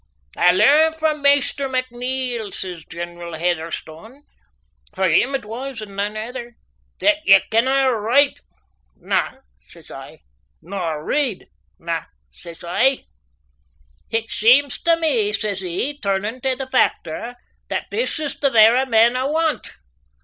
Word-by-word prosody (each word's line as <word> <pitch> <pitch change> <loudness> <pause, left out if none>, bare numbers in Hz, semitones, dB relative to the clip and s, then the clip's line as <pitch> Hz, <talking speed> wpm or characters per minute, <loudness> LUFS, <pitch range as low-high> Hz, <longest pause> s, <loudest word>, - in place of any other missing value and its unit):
"I 180 - +5
learn 305 - +5
frae 315 -1 0
Maister 280 -1 +2
McNeil," 250 -3 -2
says 180 -4 -6
General 170 0 -7
Heatherstone 170 - -4 0.7
for 190 -1 +1
him 240 - +2
it 265 - -4
was 245 +3 -6
and 205 -2 -9
nane 205 +2 -2
ither 240 +2 -7 0.5
"that 310 0 +4
ye 195 -7 +7
canna 260 +4 +3
write." 240 +6 +2 0.6
"Na," - - -1 0.3
says - - -17
I. - - -11 0.4
"Nor 165 -4 -5
read?" 270 -10 -1 0.3
"Na," 165 -1 -4 0.3
says 170 -1 -12
I. 250 +10 +1 1.0
"It 225 0 -2
seems 255 +5 +3
tae 335 0 +3
me," 255 -11 0
says 205 -2 -2
he, 190 +11 -4
turnin' 205 +3 -2
tae 265 0 0
the 265 - -5
factor, 245 -3 -1 0.3
"that - - -3
this 480 -4 -1
is 300 -2 -5
the 280 - +2
vera 235 +2 +5
man 230 0 +4
I 255 +1 -1
want. 315 +1 -1
235 Hz, 135 wpm, -20 LUFS, 195-270 Hz, 1.0 s, ye